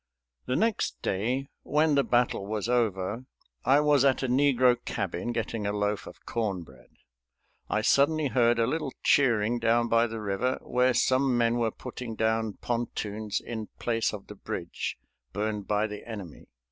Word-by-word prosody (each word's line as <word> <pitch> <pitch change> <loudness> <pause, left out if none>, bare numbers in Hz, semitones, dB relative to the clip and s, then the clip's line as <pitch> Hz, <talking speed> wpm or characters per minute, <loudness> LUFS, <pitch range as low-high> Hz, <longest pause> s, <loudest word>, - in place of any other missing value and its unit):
The 125 - 0
next 225 +4 0
day, 125 +8 -1
when 150 +1 +2
the 140 -1 +4
battle 120 -6 +1
was 105 0 -2
over, 115 -1 0 0.4
I 135 +4 +5
was 145 -2 +4
at 135 -1 +3
a - - +1
negro 130 -1 +4
cabin 100 +1 -3
getting 115 -2 -2
a - - 0
loaf 105 0 -1
of - - -13
corn 100 -6 -2
bread. 65 -4 -18 0.8
I - - +1
suddenly 145 +1 +3
heard 120 -2 +3
a 115 - +3
little 150 0 -2
cheering 120 -3 +3
down 115 +1 +2
by 115 +1 +4
the 115 0 -6
river, 105 +5 -1
where 125 0 +2
some 130 -1 +3
men 120 0 +2
were 115 -1 +2
putting 120 0 -7
down 110 -1 0
pontoons 110 -3 -3
in 110 -3 -6
place 115 -1 0
of 105 -2 -8
the - - -10
bridge - - -5 0.4
burned 105 -1 -2
by 105 0 +1
the 105 -1 -6
enemy. 100 -8 -8
115 Hz, 165 wpm, -28 LUFS, 105-130 Hz, 0.8 s, I